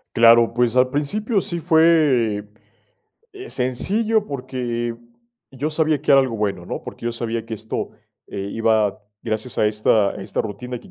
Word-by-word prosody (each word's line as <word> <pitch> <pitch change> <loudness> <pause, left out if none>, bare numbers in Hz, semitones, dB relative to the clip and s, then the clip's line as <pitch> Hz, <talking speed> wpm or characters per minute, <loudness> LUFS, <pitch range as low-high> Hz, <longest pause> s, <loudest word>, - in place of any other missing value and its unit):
Claro, 115 0 +6
pues 120 0 +1
al 125 0 +4
principio 200 - -1
sí 170 - -4
fue, 155 - +3 0.9
eh, 390 0 -9
sencillo, 205 - 0
porque 125 - -3 0.6
yo 140 +4 -3
sabía 155 -1 +1
que - - +3
era 135 - +8
algo 130 -4 -2
bueno, 100 -4 -2
¿no? - - -5
Porque - - -8
yo 120 - -1
sabía 115 -1 -3
que 115 - -4
esto, 110 +1 -5 0.4
eh, 100 0 -5
iba 110 -3 +1 0.2
gracias 110 +1 -4
a 105 - +4
esta 105 -1 +2
a - - -7
esta - - -3
rutina 120 +4 -6
que - - -17
120 Hz, 165 wpm, -21 LUFS, 110-150 Hz, 0.9 s, era